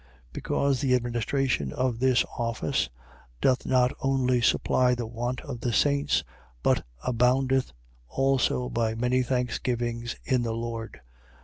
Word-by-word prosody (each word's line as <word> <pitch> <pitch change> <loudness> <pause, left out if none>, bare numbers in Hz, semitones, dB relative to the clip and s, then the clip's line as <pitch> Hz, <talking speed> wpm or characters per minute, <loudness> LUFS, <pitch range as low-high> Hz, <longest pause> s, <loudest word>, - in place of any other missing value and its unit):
9:12. - - -28
Because 140 - 0
the 130 -3 +3
administration 120 - 0
of 125 -3 -1
this 130 -1 +3
office 115 -2 -1 0.5
doth 130 - +2
not 125 -1 +3
only 130 -2 +2
supply 125 +2 +3
the 120 -1 -4
want 120 +2 -3
of 135 -5 -7
the 120 - -1
saints, 140 +5 +2 0.4
but - - +2 0.2
aboundeth 130 +2 +2 0.4
also 135 - +1
by 115 -2 -1
many 125 +2 +1
thanksgivings 120 -1 -2
in 130 -2 +1
the 115 -1 -2
Lord. 115 -1 -5
125 Hz, 130 wpm, -27 LUFS, 120-130 Hz, 0.5 s, the